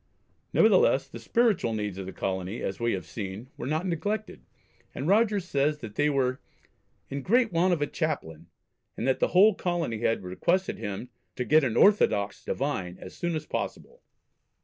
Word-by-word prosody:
Nevertheless - - +4
the - - -9
spiritual 225 - +1
needs 105 -3 -3
of 95 - -6
the - - -5
colony, 95 +3 -3
as 95 - -3
we 115 0 +1
have 95 -4 -4
seen, 100 - -7
were 120 - -6
not 155 +5 -1
neglected, 205 +5 -3 0.5
and 135 - -3
Rogers 205 -1 +3
says 150 -2 +1
that 115 -7 -9
they 145 +6 +2
were 130 -2 0 0.7
"in 140 +1 -3
great 230 - +2
want 175 +3 +3
of 160 -4 +1
a - - +2
Chaplain," 85 - -4 0.5
and 120 - -2
that 130 - +2
the - - +3
whole 205 +4 +6
colony 175 - -2
had 115 -3 0
requested 170 - 0
him 105 +2 -5 0.3
"to 125 - -2
get 155 +3 +5
an 120 -4 0
orthodox 105 - +3
divine 95 -11 -3
as 95 - -10
soon 175 -1 -2
as 155 -1 -4
possible." 480 - -5
140 Hz, 175 wpm, -27 LUFS, -, 0.7 s, whole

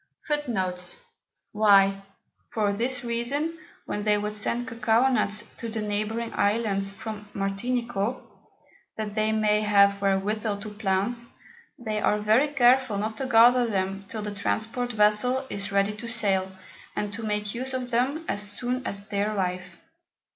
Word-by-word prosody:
FOOTNOTES: 190 - -1 0.6
[y] 195 -2 +5 0.5
For 210 -2 +1
this 245 +5 0
reason, 275 +8 -1 0.3
when 205 - -3
they 210 0 +3
would 210 0 -3
send 235 +3 -1
Cocao 230 +1 +2
Nuts 210 -2 0 0.2
to 230 - -4
the 220 -1 -3
neighbouring 215 +3 -2
Islands 200 -2 +1
from 210 +1 -7
Martinico, 210 +3 -1 0.8
that 215 -2 -4
they 215 0 +1
may 215 -1 +2
have 200 -1 +4
wherewithal 200 +2 0
to 215 - -6
plant, 210 +3 -1 0.5
they 215 -3 -3
are 210 - +2
very 215 +7 +3
careful 255 -5 +3
not 215 +2 -2
to 265 - -2
gather 240 +1 +6
them 195 -1 -2
till 215 0 -4
the 210 -1 -4
Transport 225 +4 -2
Vessel 220 +5 +3
is 200 0 -4
ready 200 +1 +1
to 235 - -6
sail, 200 -5 +1 0.5
and 205 0 -2
to 230 - -5
make 210 -1 -2
use 260 +2 -3
of 250 -1 -4
them 270 +7 0
as 205 - 0
soon 245 +5 -3
as 200 +1 -3
they 200 -1 -1
arrive. 185 -4 -2
215 Hz, 150 wpm, -26 LUFS, 200-240 Hz, 0.8 s, gather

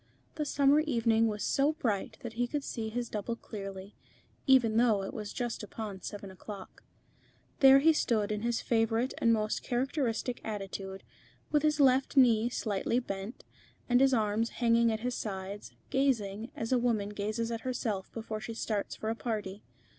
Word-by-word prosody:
The 300 - -2
summer 280 +1 +4
evening 230 -6 +2
was 210 -1 -3
so 285 +3 +2
bright 220 -10 -2
that 235 -2 -5
he 240 +2 0
could 290 +2 -3
see 220 -4 -4
his 240 +2 -3
double 215 +2 -3
clearly, 195 -3 -8 0.5
even 245 -5 +5
though 225 -4 +3
it 195 - -5
was 210 -2 -5
just 240 -2 -3
upon 210 -2 -6
seven 200 0 -7
o'clock. 190 +1 -10 0.8
There 270 -1 +9
he 320 +4 +5
stood 220 -8 +1
in 210 0 -2
his 235 0 0
favourite 225 +2 +1
and 230 - +4
most 215 -1 0
characteristic 250 -2 -1
attitude, 195 -2 -5 0.5
with 295 - +3
his 305 0 +2
left 270 0 +3
knee 235 -3 +5
slightly 220 -1 -1
bent, 200 -1 -4 0.4
and 245 +1 +4
his 270 0 +5
arms 220 -1 +1
hanging 235 -1 +3
at 220 0 -2
his 250 +1 -1
sides, 200 -2 -5 0.2
gazing, 230 -5 0
as 225 +2 -4
a 255 - +4
woman 225 -4 0
gazes 215 +3 -2
at 230 -1 -3
herself 225 -6 -3
before 220 -1 -5
she 225 +1 -6
starts 215 -2 -2
for 220 - -3
a - - -2
party. 210 -4 -4
225 Hz, 170 wpm, -31 LUFS, 210-250 Hz, 0.8 s, There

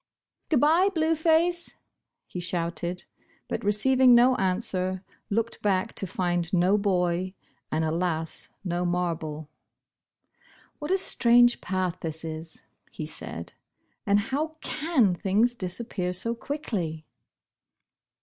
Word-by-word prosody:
••Good 300 - +3
bye, 330 +6 +5
Blue 320 0 +2
Face,"' 335 +2 +1 0.5
he 180 - -7
shouted, 175 0 -3 0.4
but - - -3
re 205 - +3
ceiving 255 +3 +5
no 250 +2 +6
answer, 185 -1 -1 0.3
looked 230 +2 -1
back, 200 +1 +1
to 195 - -2
find 175 -1 -1
no 185 +1 +3
boy, 185 -2 0 0.4
and, 160 +1 +1
alas, 165 0 -1
no 175 -1 -1
marble. 165 -4 -2 1.3
•'\Miat 295 - -4
a 380 - +4
strange 240 -8 +4
path 185 -1 -2
this 160 0 -5
is," 160 0 -7 0.3
he - - -6
said, - - -8 0.5
and 205 -2 +3
how 285 +9 -2
can 300 - +1
things 210 +6 +1
disappear 185 -2 -3
so 230 +6 -1
quickly." 205 - -4
190 Hz, 120 wpm, -27 LUFS, 175-245 Hz, 1.3 s, no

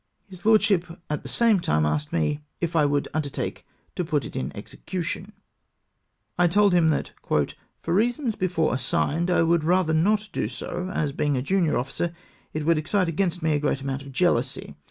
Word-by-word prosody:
His 185 0 -8
lordship 195 -5 +3
at 150 - -1
the - - -6
same 230 -4 +4
time 75 - +1
asked 75 0 -1
me 85 - 0
" - - -49
if 170 0 -2
I 155 -2 +4
would 145 0 0
undertake 145 -2 -3 0.3
to 180 - -1
put 155 -5 -1
it - - -9
in 130 - -2
execu 170 - -6
tion? 190 +5 -5 0.5
" - - -27
I 175 - +6
told 200 +2 +4
him 170 -2 +4
that 155 - -1 0.3
" - - -18
for 165 - -1
reasons 235 +5 +1
before 175 -5 0
assigned 145 +6 0
I 180 - +4
would 165 -1 +2
rather 175 0 +2
not 210 +7 +2
do - - -1
so, 175 - -5
as 150 -5 -1
being 145 0 0
a 125 - -1
junior 175 0 +2
officer, 150 +7 -2 0.4
it 155 -1 -3
would 165 -1 +3
ex 155 - -6
cite 190 -4 +2
against 175 +1 -1
me 160 -1 +2
a 145 - +1
great 145 -2 0
amount 135 0 -3
of 140 0 -10
jealousy. 130 - 0
165 Hz, 205 wpm, -25 LUFS, 145-185 Hz, 0.5 s, I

